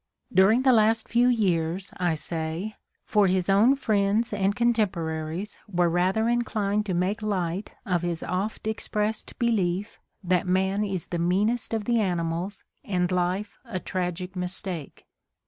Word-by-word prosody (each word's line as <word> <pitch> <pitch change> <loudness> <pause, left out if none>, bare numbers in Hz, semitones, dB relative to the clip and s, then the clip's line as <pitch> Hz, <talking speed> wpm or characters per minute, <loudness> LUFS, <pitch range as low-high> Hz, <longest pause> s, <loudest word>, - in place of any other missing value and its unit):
During 215 +7 +5
the 260 -1 +5
last 220 0 +3
few 240 +1 +3
years, 185 -6 +1
I 175 -3 +1
say, 160 +6 -4 0.3
for 210 -2 +3
his 185 0 +1
own 215 +8 +5
friends 215 -3 +1
and 200 0 +1
contemporaries 185 -6 -1
were 175 -2 +2
rather 185 +6 +1
inclined 210 -3 0
to 185 - 0
make 190 +5 0
light 190 -2 -2
of 180 -3 +1
his 175 -2 -1
oft 195 +5 -3
expressed 215 0 -2
belief 205 -5 0 0.2
that 180 0 +1
man 190 +3 +1
is 190 -5 -2
the 170 - 0
meanest 205 +7 +1
of 220 -2 -1
the 235 0 +2
animals 175 0 -2 0.2
and 180 -7 0
life 180 +3 -1
a 230 -7 -5
tragic 180 0 -3
mistake. 180 -3 -4
195 Hz, 145 wpm, -26 LUFS, 180-215 Hz, 0.3 s, During